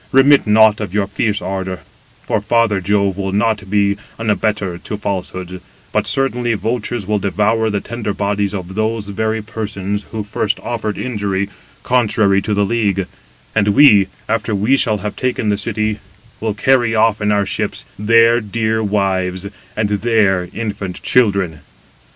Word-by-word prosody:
remit 135 Hz, -1 st, +5 dB
nought 110 Hz, 0 st, +5 dB
of 100 Hz, -2 st, -5 dB
your 105 Hz, -1 st, +2 dB
fierce 105 Hz, 0 st, -1 dB
ardour, 95 Hz, -2 st, -4 dB, 0.4 s
for 105 Hz, -, -1 dB
father 110 Hz, -2 st, +2 dB
Jove 100 Hz, 0 st, +1 dB
will 95 Hz, -1 st, -2 dB
not 105 Hz, -1 st, 0 dB
be 100 Hz, 0 st, +2 dB, 0.2 s
an 115 Hz, -1 st, 0 dB
abettor 105 Hz, -3 st, -1 dB
to 105 Hz, -, -6 dB
falsehoods, 95 Hz, -3 st, -4 dB, 0.3 s
but -, -, 0 dB
certainly 125 Hz, -3 st, 0 dB
vultures 115 Hz, 0 st, -2 dB
will 105 Hz, +1 st, 0 dB
devour 105 Hz, +3 st, +1 dB
the 100 Hz, -2 st, -1 dB
tender 115 Hz, -1 st, -4 dB
bodies 100 Hz, 0 st, -1 dB
of 95 Hz, -1 st, -6 dB
those 110 Hz, 0 st, -2 dB
very 110 Hz, +2 st, -1 dB
persons, 105 Hz, -2 st, -4 dB
who 110 Hz, -1 st, -4 dB
first 105 Hz, +1 st, -1 dB
offered 110 Hz, -3 st, -3 dB
injury, 100 Hz, -5 st, -2 dB, 0.3 s
contrary 105 Hz, -5 st, +2 dB
to 105 Hz, +1 st, -1 dB
the 100 Hz, 0 st, +2 dB
league; 100 Hz, -4 st, 0 dB, 0.5 s
and 105 Hz, -2 st, +2 dB
we, 105 Hz, -3 st, +6 dB, 0.2 s
after 115 Hz, -1 st, -1 dB
we 105 Hz, +7 st, +3 dB
shall 110 Hz, -5 st, +2 dB
have 105 Hz, +1 st, -5 dB
taken 125 Hz, -4 st, -1 dB
the 105 Hz, -, +2 dB
city, 110 Hz, 0 st, -2 dB, 0.4 s
will 110 Hz, -2 st, -2 dB
carry 120 Hz, -1 st, +2 dB
off 110 Hz, -1 st, +2 dB
in 105 Hz, 0 st, +1 dB
our 100 Hz, -1 st, +2 dB
ships -, -, -3 dB
their 115 Hz, +2 st, +5 dB
dear 110 Hz, +1 st, -1 dB
wives, 95 Hz, -3 st, 0 dB, 0.3 s
and 110 Hz, -1 st, +1 dB
their 105 Hz, -3 st, +2 dB
infant 100 Hz, -5 st, -4 dB
children." 100 Hz, -10 st, +2 dB
105 Hz, 155 wpm, -17 LUFS, 100-110 Hz, 0.5 s, we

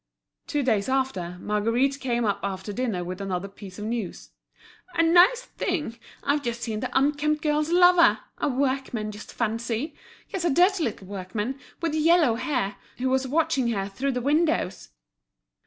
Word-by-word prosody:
Two 290 Hz, -1 st, 0 dB
days 220 Hz, -3 st, +1 dB
after, 260 Hz, -10 st, -1 dB
Margueritte 230 Hz, +7 st, +1 dB
came 240 Hz, -3 st, 0 dB
up 205 Hz, -, 0 dB
after 195 Hz, +1 st, -4 dB
dinner 225 Hz, -7 st, -1 dB
with 185 Hz, +2 st, -6 dB
another 195 Hz, -1 st, -3 dB
piece 195 Hz, -1 st, -11 dB
of 210 Hz, -, -5 dB
news. 225 Hz, -4 st, -4 dB, 0.6 s
"A 330 Hz, -, +4 dB
nice 360 Hz, +9 st, +6 dB
thing, 300 Hz, -, -3 dB, 0.2 s
I've 285 Hz, +1 st, +1 dB
just 235 Hz, -2 st, -3 dB
seen 220 Hz, -2 st, -2 dB
the 255 Hz, -, -3 dB
'unkempt 295 Hz, +2 st, +1 dB
girl's' 300 Hz, 0 st, +1 dB
lover—a 350 Hz, -3 st, +4 dB
workman, 260 Hz, -5 st, -1 dB
just 210 Hz, 0 st, -10 dB
fancy! 230 Hz, +5 st, -2 dB, 0.4 s
Yes, 375 Hz, -, -3 dB
a 345 Hz, -, +2 dB
dirty 355 Hz, +3 st, +3 dB
little 210 Hz, -4 st, -4 dB
workman, 205 Hz, +7 st, -4 dB, 0.2 s
with 330 Hz, -2 st, 0 dB
yellow 315 Hz, -4 st, +4 dB
hair, 240 Hz, -5 st, -1 dB, 0.2 s
who 260 Hz, +1 st, 0 dB
was 265 Hz, 0 st, +1 dB
watching 300 Hz, -2 st, +1 dB
her 200 Hz, -4 st, -1 dB
through 265 Hz, +8 st, -2 dB
the 250 Hz, -, -2 dB
windows." 295 Hz, -, +1 dB
255 Hz, 155 wpm, -26 LUFS, 210-300 Hz, 0.6 s, nice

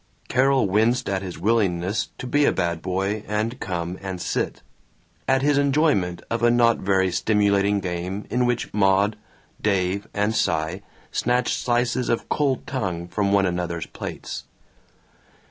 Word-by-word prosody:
Carol 135 Hz, +1 st, +3 dB
winced 115 Hz, +6 st, +2 dB
at 95 Hz, -1 st, -1 dB
his 95 Hz, -2 st, -6 dB
willingness 100 Hz, -1 st, +1 dB
to -, -, -6 dB
be 145 Hz, +3 st, +2 dB
a -, -, +4 dB
bad 85 Hz, -3 st, -1 dB
boy 95 Hz, +3 st, -1 dB
and 110 Hz, +4 st, -2 dB
come 85 Hz, -1 st, -3 dB
and 95 Hz, -2 st, -5 dB
sit, -, -, -2 dB, 0.6 s
at 135 Hz, 0 st, +3 dB
his 145 Hz, 0 st, +3 dB
enjoyment 140 Hz, -, +2 dB
of 115 Hz, 0 st, -2 dB
a 120 Hz, -, +5 dB
not 120 Hz, -1 st, +4 dB
very 95 Hz, -1 st, +2 dB
stimulating 100 Hz, 0 st, +2 dB
game 90 Hz, +2 st, -4 dB
in 125 Hz, 0 st, +2 dB
which 120 Hz, -1 st, -1 dB
Maud, 100 Hz, +1 st, +3 dB, 0.5 s
Dave, 100 Hz, 0 st, 0 dB
and 105 Hz, +2 st, 0 dB
Cy 85 Hz, -2 st, 0 dB, 0.3 s
snatched 125 Hz, 0 st, +1 dB
slices 120 Hz, +1 st, 0 dB
of 115 Hz, -, -1 dB
cold 140 Hz, -3 st, 0 dB
tongue 95 Hz, -10 st, -3 dB
from 100 Hz, +3 st, 0 dB
one 100 Hz, -1 st, +4 dB
another's 90 Hz, -2 st, -2 dB
plates. -, -, -7 dB
100 Hz, 145 wpm, -23 LUFS, 95-120 Hz, 0.6 s, a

